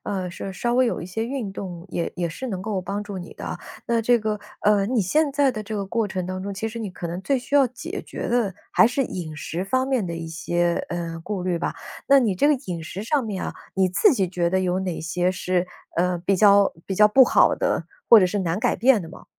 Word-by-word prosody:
呃， 185 -3 -3
是 190 +2 -6
稍 240 +5 -1
微 255 0 +4
有 235 - -1
一 170 - -6
些 220 +5 -3
运 245 -5 -3
动， 180 -3 -7
也 170 -1 -3
也 175 -2 -2
是 260 +11 -6
能 190 -4 -3
够 205 -1 -2
帮 200 +2 -3
助 205 -2 -7
你 175 - -8
的。 - - -6 0.3
那 230 -1 +1
这 240 +1 +4
个， 215 -1 -2 0.2
呃， 205 -1 +3
你 240 +2 +1
现 285 - +1
在 280 -1 +3
的 215 -4 -5
这 215 +1 -6
个 200 -1 -2
过 225 +2 0
程 185 -2 -4
当 185 0 -4
中， 200 0 -4
其 220 +3 -3
实 230 +1 -7
你 210 -4 -4
可 175 - -6
能 170 +2 -4
最 275 +5 +1
需 265 +3 -5
要 275 -2 +6
解 255 - -6
决 - - -6
的 235 -6 +1 0.2
还 - - +6
是 250 +4 0
饮 170 -9 -5
食 165 +4 -4
方 260 +6 0
面 250 -8 +1
的 170 - -4
一 165 0 -5
些， 170 +1 0 0.2
呃， 170 -1 -4
顾 200 -3 -3
虑 180 -2 0
吧。 175 - -2 0.3
那 275 0 +7
你 225 -7 +2
这 235 - +2
个 300 - +5
饮 170 -3 -4
食 190 +5 -6
上 270 +3 0
面 205 -4 -4
啊， - - -4 0.2
你 190 -1 +2
自 360 - +4
己 195 -8 0
觉 175 -1 0
得 190 0 +2
有 180 0 0
哪 180 -4 -3
些 175 +3 0
是， 185 -1 -1 0.3
呃， 180 +1 +1
比 190 +3 +1
较 200 0 +6
比 195 - -3
较 210 +2 +6
不 260 +5 +7
好 - - +4
的， - - -1 0.3
或 225 -3 +10
者 185 - +4
是 205 +3 -1
难 175 +2 -1
改 245 - +1
变 245 -2 +4
的 165 - -8
吗？ - - -13
195 Hz, 280 characters per minute, -23 LUFS, 180-230 Hz, 0.3 s, 或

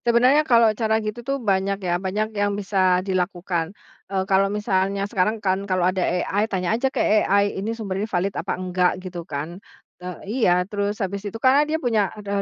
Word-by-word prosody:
Sebenarnya 250 +5 +5
kalau 230 -3 +5
cara 220 0 +1
gitu 215 +2 -4
tuh 275 +3 -2
banyak 195 -4 0
ya, 175 0 0
banyak 210 +3 -2
yang 205 -1 0
bisa 190 -2 +1
dilakukan, 180 -3 -1 0.4
eee, 190 -1 -1
kalau 195 0 +3
misalnya 200 -1 0
sekarang 200 +2 0
kan 195 -1 -1
kalau 185 -1 +1
ada 185 +1 +1
AI, 195 +5 0
tanya 185 -1 -1
aja 255 +4 +1
ke - - -9 0.2
AI, 200 +1 +2
"Ini 225 +3 -3
sumbernya 205 -1 -3
valid 190 +1 -1
apa - - -3
enggak?" 180 0 0
Gitu 185 -2 -7
kan, 160 +6 -5 0.4
te 180 - -5 0.2
iya, 195 -5 +2
terus 205 +1 -2
habis 200 -1 -3
itu 225 - -7
karena 260 +4 +4
dia 315 - +1
punya, 225 -9 +1
eee, 200 -1 -2
200 Hz, 190 wpm, -23 LUFS, 185-215 Hz, 0.4 s, Sebenarnya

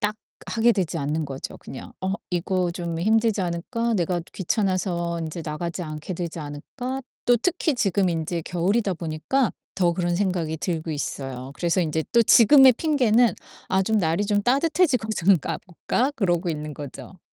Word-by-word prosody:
딱 210 +1 0 0.3
하게 235 +1 +3
되지 180 -6 -1
않는 150 +2 -1
거죠, 135 -1 -6
그냥. 130 - -10
'어 190 +1 -1 0.2
이거 180 0 0
좀 170 -1 -4
힘들지 220 +1 +2
않을까? 230 +8 -2
내가 175 -2 0
귀찮아서 185 -3 -1
인제 160 +1 -5
나가지 170 +3 -4
않게 155 +3 -5
되지 170 -1 -5
않을까?' 245 - -6 0.2
또 245 - +6
특히 320 +3 0
지금 195 -4 +1
인제 165 0 -2
겨울이다 190 +5 0
보니까 170 - 0 0.2
더 175 -2 +2
그런 175 0 -1
생각이 180 -5 -1
들고 160 -1 -3
있어요. 135 -3 -4
그래서 175 +3 +1
인제 160 -1 -1
또 235 - +6
지금의 260 +4 +7
핑계는 245 -5 +3 0.3
'아 190 0 +2
좀 220 +3 +1
날이 170 +2 +1
좀 205 0 +1
따뜻해지고 275 - +2
좀 190 +1 +4
가 - - -4
볼까?' 215 - -1
그러고 175 -5 +1
있는 150 -2 -4
거죠. 145 +6 -9
180 Hz, 335 characters per minute, -24 LUFS, 165-220 Hz, 0.3 s, 지금의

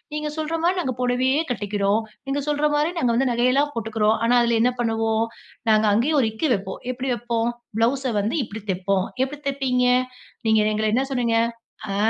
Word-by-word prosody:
நீங்க 300 0 -2
சொல்ற 315 +1 -3
மாரி 365 +2 +2
நாங்க 260 -6 -2
பொடவையே 255 +3 +2
கட்டிக்கிறோம். 205 -1 0 0.3
நீங்க 275 +1 -1
சொல்ற 295 0 +1
மாரி 300 +3 +1
நாங்க 245 -6 +2
வந்து 260 +2 +2
நகையெல்லாம் 255 +5 +2
போட்டுக்கிறோம். 225 -1 +1
ஆனா 235 +1 +3
அதில 235 -1 +2
என்ன 250 - +3
பண்ணுவோம்? 225 -1 +1 0.5
நாங்க 215 0 +4
அங்கேயும் 280 +8 +2
ஒரு 230 - +2
இக்கு 220 +8 -1
வைப்போம். 190 -1 -6
எப்டி 255 +1 -4
வைப்போம்? 235 0 -2 0.4
ப்ளவுஸ்ஸ 255 +4 +1
வந்து 205 +6 0
இப்படி 220 -1 -7
தைப்போம்." 190 0 0 0.2
எப்படி 270 +3 -1
தைப்பீங்க?" 265 -2 +1 0.6
நீங்க 220 -1 +4
எங்கள 215 +1 -1
என்ன 255 +3 +2
சொன்னீங்க? 240 -4 +1 0.6
அ - - -2
240 Hz, 175 wpm, -23 LUFS, 220-270 Hz, 0.6 s, நாங்க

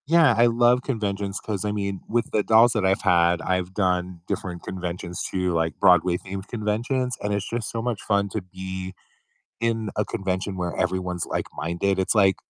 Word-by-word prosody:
Yeah, 160 -4 +6
I 120 +1 +6
love 120 +1 +4
conventions 100 -6 -2
'cause, 100 -4 -4
I 105 - -1
mean, 100 -2 -3
with 120 +1 0
the 105 - +2
dolls 115 +2 +6
that 110 -4 0
I've 95 +1 +2
had, 85 -2 +3
I've 90 0 -1
done 90 -3 0
different 90 -2 -4
conventions 90 -1 -5
too, 90 -1 -1
like 80 -1 -1
Broadway 90 -1 +5
themed 95 +2 -7
conventions, 120 +3 -1
and 105 0 -1
it's 100 0 -2
just 115 -2 -3
so 115 - -3
much 120 -3 -2
fun 100 -1 +1
to 110 - -3
be 95 0 -6 0.7
in 115 -2 0
a 105 - 0
convention 95 0 -2
where 90 -1 -2
everyone's 90 -1 -1
like-minded, 85 +5 -2
it's, 95 - +1
like, 95 -4 +5
95 Hz, 180 wpm, -24 LUFS, 90-110 Hz, 0.7 s, Yeah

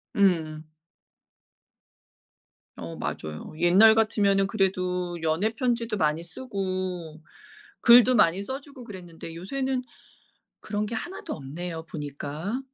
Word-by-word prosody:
음음. 160 -5 +1 2.1
어 85 0 -6
맞아요. 75 - -5
옛날 190 +7 +7
같으면은 200 -3 +3
그래도 180 -3 -1
연애편지도 225 - 0
많이 155 -1 +1
쓰고 185 -5 -4 0.6
글도 245 +1 +8
많이 180 +1 +4
써주고 270 +2 -7
그랬는데 175 -6 -9
요새는 260 +8 -2 0.8
그런 210 0 -2
게 225 - -5
하나도 345 +12 -5
없네요, 160 +4 -6
보니까. 150 - -4
185 Hz, 235 characters per minute, -26 LUFS, 165-220 Hz, 2.1 s, 글도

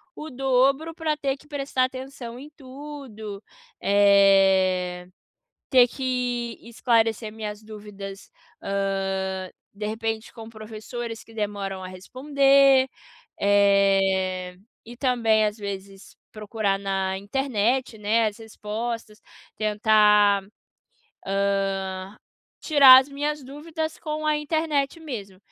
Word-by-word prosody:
o 310 +1 -8
dobro 270 +4 +1
pra 315 -2 -2
ter 275 -2 -1
que 290 - -20
prestar 275 -3 -1
atenção 255 -2 -8
em 290 +2 -11
tudo, 260 -7 -9 0.4
eh, 195 -3 +4 0.6
ter 250 -2 +6
que 245 -3 -3
esclarecer 225 -2 0
minhas 210 -1 -6
dúvidas, 205 -2 -10 0.3
hã, 195 -1 -2 0.2
de 210 +1 -5
repente 225 +1 -4
com 225 -2 -10
professores 225 +1 -7
que 225 - -17
demoram 200 -3 -4
a 185 - -7
responder, 270 +6 +3 0.5
eh, 195 -2 +2 0.3
e 240 +1 -10
também 230 -4 +2
às 210 0 -1
vezes 195 -1 -8 0.2
procurar 210 -2 -2
na 195 -1 -2
internet, 240 +1 -1
né, 220 +2 +2
as 210 +1 -4
respostas, 220 0 -6 0.4
tentar, 210 -1 +4 0.8
hã, 195 0 -2 0.4
tirar 275 -4 +8
as 265 - -7
minhas 290 0 -3
dúvidas 315 +4 -5
com 310 -1 -4
a 305 - +2
internet 300 -1 -1
mesmo. 205 -11 -7
220 Hz, 105 wpm, -24 LUFS, 200-265 Hz, 0.8 s, tirar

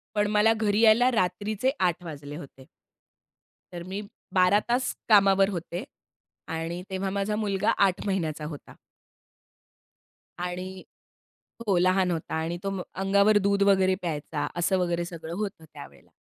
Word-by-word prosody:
पण 205 0 +2
मला 210 +1 +4
घरी 215 -2 0
यायला 230 +3 +6
रात्रीचे 210 +5 0 0.2
8 175 +1 -3
वाजले 145 -3 -8
होते. 135 -4 -11 1.1
तर 175 -1 -7
मी 190 +3 -5 0.3
12 185 +2 +5
तास 250 +2 +1 0.2
कामावर 195 -1 +5
होते 175 0 -5 0.6
आणि 165 +2 -4
तेव्हा 190 0 -2
माझा 200 +2 -1
मुलगा 210 0 0 0.2
8 185 - -3
महिन्यांचा 160 -6 -2
होता. 150 -2 -9 1.6
आणि 180 +1 -5 0.8
हो. 195 -3 +2
लहान 185 +1 +3
होता. 165 -2 -3
आणि 165 +2 -2
तो 195 - -1 0.2
अंगावर 200 +2 +3
दूध 200 0 +2
वगैरे 190 -1 +4
प्यायचा. 155 -4 -3
असं 175 +2 +1
वगैरे 175 -1 0
सगळं 170 -1 -7
होतं 200 -6 -4
त्यावेळेला. - - -13
190 Hz, 135 wpm, -26 LUFS, 170-205 Hz, 1.6 s, यायला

